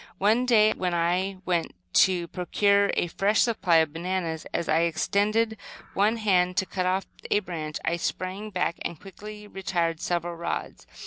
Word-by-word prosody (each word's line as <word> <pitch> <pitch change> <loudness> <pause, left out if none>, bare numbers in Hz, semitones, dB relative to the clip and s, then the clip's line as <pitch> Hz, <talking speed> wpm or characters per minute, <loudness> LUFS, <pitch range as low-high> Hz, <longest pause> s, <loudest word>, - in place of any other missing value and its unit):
One 220 +6 +2
day 215 -3 +5
when 180 -2 -2
I 180 +3 0
went 170 -2 -1 0.2
to 180 -2 +4
procure 200 +2 +2
a - - +1
fresh 200 +5 +1
supply 210 -7 +1
of 160 -2 +3
bananas, 170 -1 -3
as 170 - -2
I 155 - +3
extended 210 +6 +1 0.4
one 210 +4 +2
hand 180 -4 +2
to 190 - +2
cut 185 -1 -2
off 185 +1 0 0.2
a 205 - +3
bunch, 160 -6 -5
I 170 - +1
sprang 185 +4 -3
back 180 -3 -1
and 165 - -5
quickly 210 +2 -10
retired 170 -4 -2
several 175 -1 -2
rods. 170 +1 -5
185 Hz, 165 wpm, -26 LUFS, 170-205 Hz, 0.4 s, day